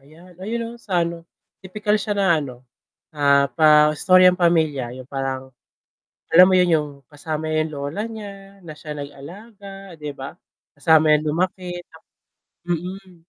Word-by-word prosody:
,ayan. 170 +5 -18
Ayun 220 +5 -3
'no, 230 - -6
sa 185 -6 -1
ano, 170 0 -4 0.4
tipikal 210 +2 -1
siya 210 +1 -3
na 195 -4 +2
ano, 130 -3 -9 0.5
ah, 140 -1 +3
pa 150 -1 +5
istoryang 185 +2 +5
pamilya. 160 -8 +1
Yung 130 0 -11
parang 135 -1 -4 0.9
alam 180 +2 +9
mo - - +2
yun, 180 -1 +3
yung 150 -1 -2 0.2
kasama 155 +1 -5
yung 155 0 -1
lola 145 +7 -5
niya, 200 -3 -11
na 170 -5 -10
siya 150 0 -10
nag-alaga 195 +7 -11
'di 150 -2 -7
ba. 135 -1 -9 0.4
Kasama 155 +1 +4
niya - - +1
lumaki 180 +1 -3
tap 160 - -18 0.6
mm, 180 +2 -5
165 Hz, 150 wpm, -21 LUFS, 150-190 Hz, 0.9 s, alam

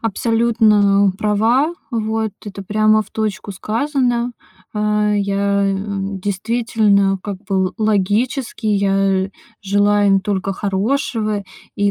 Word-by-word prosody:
абсолютно 215 -3 +3
права. 230 +10 +2 0.2
Вот, 220 -2 -1
это, 200 -1 -7
прямо, 215 +2 +2
в 210 - -20
точку 215 -2 -3
сказано. 245 +3 -1 0.4
Э, 210 0 +1
я, 200 0 0
э, 195 0 0 0.4
действительно, 205 0 +1
как 200 -2 -5
бы, 190 -2 0
л 185 - -6
логически, 220 +4 0
я 195 -2 +1 0.3
желаю 205 +1 +2
им 195 0 +4
только 195 0 -2
хорошего. 210 +2 -1 0.3
И, 205 0 +2
210 Hz, 110 wpm, -18 LUFS, 200-225 Hz, 0.4 s, им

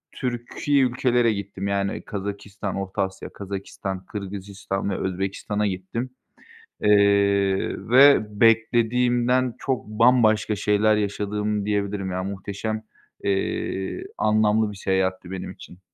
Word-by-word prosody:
Türki 125 +3 0
ülkelere 125 -2 +2
gittim, 100 -1 -5
yani, 100 0 -1
Kazakistan, 100 0 -5
Orta 95 +1 -3
Asya, 95 0 -6
Kazakistan, 95 -1 -6
Kırgızistan 100 0 -5
ve 95 - -2
Özbekistan’a 95 +3 -2
gittim. 100 +7 -4 0.7
Eee, 100 -1 +3
ve 140 +4 +8 0.2
beklediğimden 120 +2 +3
çok 130 -2 -2
bambaşka 110 -1 +3
şeyler 105 +1 +3
yaşadım 105 0 -1
diyebilirim. 100 -2 -1
Ya, 95 0 -2
muhteşem, 100 +3 -4 0.4
eee, 95 -1 -2
anlamlı 110 0 +2
bir 100 - -10
seyahatti 95 -1 -1
benim 95 - -5
için. 90 - -13
105 Hz, 105 wpm, -24 LUFS, 95-110 Hz, 0.7 s, ve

